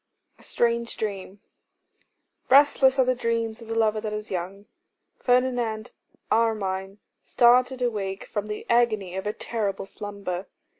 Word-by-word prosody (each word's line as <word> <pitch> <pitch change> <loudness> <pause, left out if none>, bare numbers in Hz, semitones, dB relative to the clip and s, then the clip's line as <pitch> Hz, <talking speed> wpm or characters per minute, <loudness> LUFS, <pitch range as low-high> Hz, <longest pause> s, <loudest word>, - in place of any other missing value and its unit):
A - - -18
Strange 235 0 0
Dream. 200 -2 -5 1.1
RESTLESS 275 -1 +5
are 260 - +4
the 255 - +3
dreams 230 -2 -2
of 230 - -11
the 225 - -3
lover 220 -1 +2
that 215 -1 -4
is 210 0 -6
young. 190 +3 -4 0.5
Ferdinand 245 -3 0 0.4
Armine 195 -4 0 0.3
started 250 +1 +3
awake 200 -5 -2
from 205 0 -4
the 210 0 -5
agony 215 -6 +1
of 190 +2 -4
a 210 - -1
terrible 210 -5 -3
slumber. 200 -2 -6
220 Hz, 135 wpm, -25 LUFS, 200-240 Hz, 1.1 s, RESTLESS